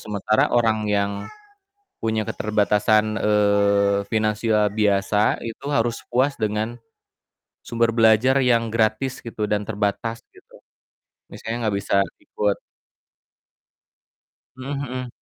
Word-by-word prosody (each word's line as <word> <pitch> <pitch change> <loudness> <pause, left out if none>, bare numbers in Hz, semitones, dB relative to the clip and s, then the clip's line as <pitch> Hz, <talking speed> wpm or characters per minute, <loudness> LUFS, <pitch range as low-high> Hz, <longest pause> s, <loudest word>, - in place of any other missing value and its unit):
Sementara 105 +1 0
orang 110 -3 +1
yang 100 -1 +1 0.9
punya 110 -1 0
keterbatasan, 105 +1 +1
eee, 100 -1 +2
finansial 110 -1 +1
biasa, 105 0 +1
itu 115 +4 -7
harus 115 -3 0
puas 130 +3 +2
dengan 110 +3 -2 0.9
sumber 115 0 +1
belajar 115 +3 +4
yang 115 -2 +2
gratis 110 +3 0
gitu 110 -3 -4
dan 105 0 0
terbatas, 110 +2 -2
gitu. - - -19 0.7
Misalnya 115 +1 -5
gak - - -3
bisa 100 - 0 0.3
ikut 105 -1 -1 2.0
Mhm 130 +1 -8 0.2
mhm. 125 -1 -5
110 Hz, 100 wpm, -22 LUFS, 105-115 Hz, 2.0 s, belajar